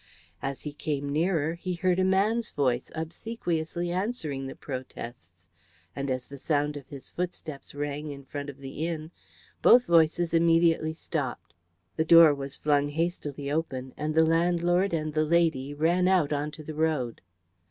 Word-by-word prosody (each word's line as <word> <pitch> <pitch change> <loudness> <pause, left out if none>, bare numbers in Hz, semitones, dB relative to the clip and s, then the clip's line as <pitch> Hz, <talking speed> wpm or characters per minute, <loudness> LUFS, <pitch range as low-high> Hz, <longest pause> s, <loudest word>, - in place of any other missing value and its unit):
As 135 0 -4
he 150 - -6
came 145 -1 -3
nearer 160 +1 +1
he 180 +1 -4
heard 180 +1 +1
a - - +3
man's 205 +5 +2
voice 130 -3 0
obsequiously 170 -1 -3
answering 175 - -2
the 135 - -7
protests, 115 - -8 0.5
and 140 0 -3
as 130 -1 -2
the 140 -1 -10
sound 150 0 0
of 140 -2 -8
his 140 -2 -10
footsteps 160 -6 -5
rang 145 +1 -3
in 140 -1 -8
front 145 +1 -5
of 140 - -9
the 140 +4 -4
inn 160 -1 -5 0.5
both 245 +1 +7
voices 165 0 +3
immediately 165 -1 +3
stopped. 140 - -4 0.4
The 160 - +2
door 165 -2 +8
was 140 -1 -5
flung 145 -1 +2
hastily 145 -3 -3
open, 130 -5 -2
and 155 +1 -3
the 160 0 +6
landlord 175 +3 +2
and 155 -2 -2
the 155 0 +2
lady 155 -4 +2
ran 170 +5 +2
out 180 -6 +3
onto 150 +2 -3
the 155 - -6
road. 150 -7 -1
155 Hz, 160 wpm, -28 LUFS, 140-170 Hz, 0.5 s, door